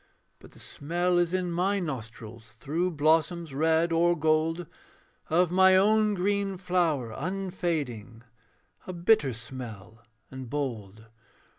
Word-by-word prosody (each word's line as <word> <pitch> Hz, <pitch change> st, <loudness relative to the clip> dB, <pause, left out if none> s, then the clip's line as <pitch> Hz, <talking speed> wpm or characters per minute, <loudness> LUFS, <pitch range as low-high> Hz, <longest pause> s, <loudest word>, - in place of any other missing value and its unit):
But -, -, -16 dB
the -, -, -16 dB
smell 175 Hz, +4 st, -1 dB
is 175 Hz, -1 st, +1 dB
in 185 Hz, -1 st, -1 dB
my 190 Hz, +4 st, 0 dB
nostrils, 115 Hz, -, -7 dB
Through 160 Hz, +9 st, -1 dB
blossoms 160 Hz, +1 st, +1 dB
red 160 Hz, +3 st, +2 dB
or 170 Hz, +1 st, +2 dB
gold, 160 Hz, +2 st, +1 dB, 0.6 s
Of 175 Hz, +2 st, +2 dB
my 190 Hz, +1 st, +5 dB
own 215 Hz, +1 st, +3 dB
green 200 Hz, +1 st, -1 dB
flower 170 Hz, -10 st, 0 dB
unfading, 155 Hz, -, -4 dB, 0.6 s
A 185 Hz, -, -5 dB
bitter 170 Hz, -5 st, +2 dB
smell 115 Hz, -2 st, -9 dB, 0.3 s
and 130 Hz, -2 st, -8 dB
bold. 110 Hz, -7 st, -5 dB
165 Hz, 120 wpm, -27 LUFS, 130-180 Hz, 0.6 s, my